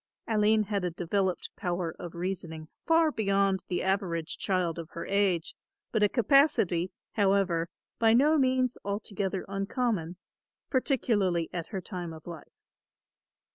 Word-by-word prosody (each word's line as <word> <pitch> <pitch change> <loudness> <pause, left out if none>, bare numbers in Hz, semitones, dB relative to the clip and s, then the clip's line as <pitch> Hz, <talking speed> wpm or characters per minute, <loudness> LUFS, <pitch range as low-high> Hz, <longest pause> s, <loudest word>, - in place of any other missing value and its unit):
Aline 215 0 +3
had 200 -2 -2
a 180 - +1
developed 180 +2 -1
power 175 -3 -2
of 175 -2 -7
reasoning 170 -3 -4 0.2
far 325 -1 +4
beyond 195 -5 +1
the 180 - -1
average 180 -4 -1
child 180 -4 0
of 165 -1 -7
her 170 - -5
age 195 -4 +1 0.4
but 220 - +1
a 210 - +5
capacity, 225 - +3 0.2
however, 195 -5 +2 0.3
by 225 -1 +5
no 300 +5 +5
means 255 -1 +1
altogether 200 -1 -3
uncommon, 195 -3 -2 0.5
particularly 210 - +1
at 170 -2 -4
her 195 -4 -4
time 175 -2 -6
of 160 -1 -12
life. 170 -3 -11
195 Hz, 135 wpm, -29 LUFS, 175-215 Hz, 0.5 s, a